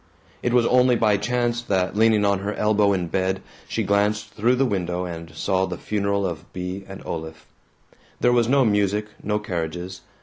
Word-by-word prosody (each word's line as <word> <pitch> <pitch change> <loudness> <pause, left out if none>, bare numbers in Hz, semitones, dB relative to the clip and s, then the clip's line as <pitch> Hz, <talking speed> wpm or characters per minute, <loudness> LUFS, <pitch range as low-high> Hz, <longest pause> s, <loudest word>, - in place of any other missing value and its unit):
It 120 - 0
was 120 -1 +4
only 125 0 +4
by 105 -3 +3
chance 120 +2 0
that, 95 -4 0
leaning 110 -1 +4
on 100 -1 +2
her 100 +2 -3
elbow 105 -1 +3
in 95 -3 0
bed, 95 +2 0 0.3
she - - -1
glanced 105 +1 +1
through 120 +4 +2
the 135 +2 +2
window 90 -5 -1
and 85 -2 -7
saw 95 +3 0
the 90 -2 -5
funeral 100 -1 -1
of 85 -2 -5
Bea 90 +2 -5
and 95 0 -9
Olaf. 80 -1 -6 0.7
There 120 - +3
was 120 -1 +3
no 135 -1 +4
music, 105 0 +1
no 105 +1 0
carriages. 90 -1 -4
100 Hz, 180 wpm, -23 LUFS, 95-110 Hz, 0.7 s, was